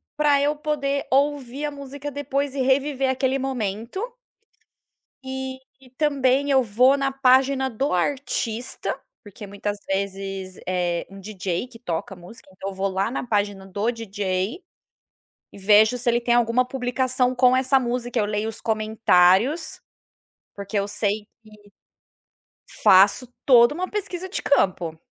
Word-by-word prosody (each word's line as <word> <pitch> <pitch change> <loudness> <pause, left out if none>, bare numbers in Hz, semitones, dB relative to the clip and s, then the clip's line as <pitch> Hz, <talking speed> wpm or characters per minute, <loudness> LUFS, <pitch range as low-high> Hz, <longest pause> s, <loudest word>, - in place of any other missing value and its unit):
para 290 -2 +3
eu 295 +1 +1
poder 285 -2 -2
ouvir 280 0 0
a 295 - -3
música 280 0 -7
depois 280 0 -3
e 270 - -1
reviver 270 0 +1
aquele 265 0 0
momento 240 - -3 1.2
e 265 0 -5 0.2
e 255 -2 -19
também 280 -1 +1
eu 265 -2 +4
vou 250 +6 +4
na 275 -1 0
página 265 0 +3
do 265 +3 -2
artista, 240 +2 -2 0.2
porque 205 0 -11
muitas 205 +1 -4
vezes 195 -1 -4
é 175 -2 -1
um 195 0 -12
DJ 190 +1 -4
que 235 -2 -14
toca 180 0 -4
música. 180 +3 -14
Então, 190 +1 -6
eu - - -9
vou 195 +1 -1
lá 195 +3 -1
na 260 - -3
página 205 -2 -1
do 205 +5 -1
DJ, 200 - -3 0.9
e - - -12
vejo 215 +4 +4
se 245 0 0
ele 240 0 +2
tem 240 0 +1
alguma 240 +1 +3
publicação 255 0 0
com 250 0 +4
essa 265 +1 +3
música, 245 -1 -2
eu 210 - +2
leio 210 +1 -2
os 225 - -9
comentários, 220 - +2 0.8
porque 200 +1 -4
eu 200 - -2
sei 205 0 -1
que - - -52 1.5
Faço 200 +6 +6 0.2
toda 240 0 +6
uma 370 +2 -3
pesquisa 375 -3 -4
de 380 - -4
campo. 180 - +1
245 Hz, 145 wpm, -23 LUFS, 200-270 Hz, 1.5 s, Faço